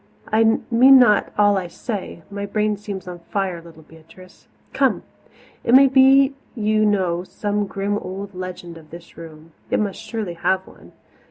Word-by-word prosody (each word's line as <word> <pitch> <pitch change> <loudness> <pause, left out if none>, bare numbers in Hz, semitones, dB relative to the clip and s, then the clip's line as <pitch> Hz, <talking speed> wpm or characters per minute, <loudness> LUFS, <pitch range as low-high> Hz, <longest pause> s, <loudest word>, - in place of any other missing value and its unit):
I 225 +1 +3
mean 260 +4 +7
not 225 -5 +3
all 205 -1 +3
I 180 - -6
say 190 -2 -7
my 200 0 -5
brain 210 +1 -1
seems 200 -2 -8
on 175 -1 -8
fire, 190 -4 -2
little 165 -1 -16
Beatrice. 165 +4 -18 0.3
Come; - - +1 0.6
it 240 - +4
may 275 +1 +8
be 270 +1 +5 0.2
you 215 -1 +1
know 180 -4 0
some 205 +2 -3
grim 200 +1 -3
old 195 +1 -8
legend 180 -2 -8
of 155 -1 -19
this 170 0 -13
room 160 -1 -13 0.2
it - - 0
must 205 -3 -3
surely 215 -6 -5
have 190 +2 -1
one. - - -18
200 Hz, 165 wpm, -21 LUFS, 175-215 Hz, 0.6 s, may